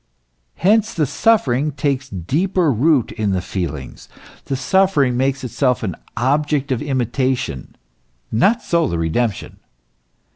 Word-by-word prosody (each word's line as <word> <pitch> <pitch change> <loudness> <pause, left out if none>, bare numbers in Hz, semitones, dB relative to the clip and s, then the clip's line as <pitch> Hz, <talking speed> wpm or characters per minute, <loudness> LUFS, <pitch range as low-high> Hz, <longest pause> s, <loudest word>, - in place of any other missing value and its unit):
Hence 215 +4 +2
the 155 - +2
suffering 145 - +1
takes 135 -2 -1
deeper 155 - 0
root 135 +1 +2
in 110 -3 -1
the 95 - +1
feelings; 80 -8 -5 0.4
the 135 - -2
suffering 145 -2 +2
makes 135 +1 0
itself 125 +1 0
an 95 -6 -2 0.2
object 145 +3 0
of 125 - 0
imitation; 130 - -2 0.6
not 205 - +2
so 170 -2 +1
the 85 - -2
redemption. 100 +7 -2
135 Hz, 120 wpm, -19 LUFS, 115-155 Hz, 0.6 s, Hence